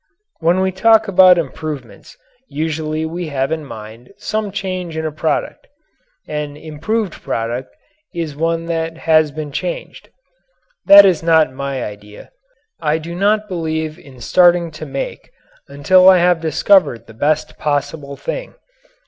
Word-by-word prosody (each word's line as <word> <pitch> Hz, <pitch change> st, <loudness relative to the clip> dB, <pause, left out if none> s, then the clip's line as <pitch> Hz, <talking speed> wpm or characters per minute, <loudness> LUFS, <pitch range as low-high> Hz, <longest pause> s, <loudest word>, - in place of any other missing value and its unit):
When 175 Hz, +3 st, +2 dB
we 190 Hz, 0 st, +1 dB
talk 220 Hz, +3 st, +4 dB
about 185 Hz, -2 st, +6 dB
improvements 140 Hz, -7 st, -6 dB, 0.3 s
usually 155 Hz, 0 st, -3 dB
we 170 Hz, +1 st, -5 dB
have 135 Hz, -1 st, -2 dB
in 160 Hz, -1 st, -2 dB
mind 110 Hz, -2 st, -11 dB
some 215 Hz, -2 st, -3 dB
change 185 Hz, -4 st, -4 dB
in 160 Hz, -, -3 dB
a 155 Hz, -, -2 dB
product. 155 Hz, +1 st, -3 dB, 0.6 s
An 150 Hz, -1 st, -5 dB
"improved" 160 Hz, +6 st, -3 dB
product 120 Hz, +3 st, -4 dB, 0.4 s
is 165 Hz, -5 st, -5 dB
one 165 Hz, +2 st, -1 dB
that 165 Hz, -1 st, -3 dB
has 155 Hz, -2 st, +3 dB
been 150 Hz, 0 st, -7 dB
changed. -, -, -5 dB, 0.8 s
That 200 Hz, 0 st, +10 dB
is 180 Hz, -5 st, +2 dB
not 160 Hz, -4 st, +3 dB
my 135 Hz, -1 st, -4 dB
idea. 105 Hz, 0 st, -10 dB, 0.5 s
I 155 Hz, 0 st, 0 dB
do 165 Hz, +2 st, -7 dB
not 210 Hz, +4 st, +1 dB
believe 160 Hz, -3 st, -3 dB
in 130 Hz, -6 st, -15 dB
starting 175 Hz, 0 st, +3 dB
to 155 Hz, 0 st, -9 dB
make 135 Hz, 0 st, -6 dB, 0.4 s
until 185 Hz, +7 st, +5 dB
I 185 Hz, -, +7 dB
have 175 Hz, -1 st, +2 dB
discovered 160 Hz, -, +2 dB
the 110 Hz, -, -14 dB
best 145 Hz, +7 st, -1 dB
possible 145 Hz, -1 st, -2 dB
thing. -, -, -6 dB
160 Hz, 140 wpm, -17 LUFS, 145-180 Hz, 0.8 s, That